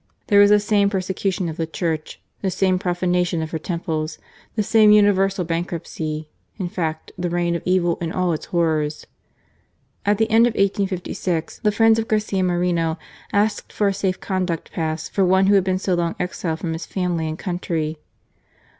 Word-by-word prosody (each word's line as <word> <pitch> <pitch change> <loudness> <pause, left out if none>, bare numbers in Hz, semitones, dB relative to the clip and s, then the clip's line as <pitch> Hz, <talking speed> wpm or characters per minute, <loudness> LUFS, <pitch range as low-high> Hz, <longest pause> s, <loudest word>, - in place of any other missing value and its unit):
There 205 - +6
was 205 0 +7
the 210 0 +6
same 205 -1 +2
persecution 190 -1 -1
of 160 - -5
the 165 - -2
Church, 160 -2 -3 0.2
the 195 - 0
same 185 0 +1
profanation 180 -1 0
of 160 - -6
her 160 - -2
temples, 160 -2 -3 0.4
the 215 - +1
same 215 0 +5
universal 195 -3 +4
bankruptcy 165 -2 -3 0.2
— - - -43
in 185 -4 -3
fact 160 -3 -3
the 175 0 -1
reign 175 0 0
of 170 - -3
evil 180 -2 +2
in 165 -1 -2
all 180 -1 0
its 155 - -5
horrors. 155 -3 0 1.0
At 205 0 +2
the 220 +1 +2
end 230 +2 +6
of 240 - -1
1856 185 -4 -1
the 210 - +2
friends 225 +1 +4
of 225 - -2
Garcia 210 -3 0
Moreno 175 -2 +1 0.3
asked 205 +1 0
for 205 -1 +1
a - - -1
safe 190 -1 -1
conduct 185 -4 -2
pass 160 -1 -2
for 195 - 0
one 190 +1 +4
who 200 - +4
had 195 -2 +5
been 185 0 0
so 185 0 -1
long 170 -1 0
exiled 175 -2 -2
from 165 -1 -3
his 165 - -6
family 175 -4 -1
and 155 - -4
country. 165 -4 -3
180 Hz, 185 wpm, -22 LUFS, 165-200 Hz, 1.0 s, was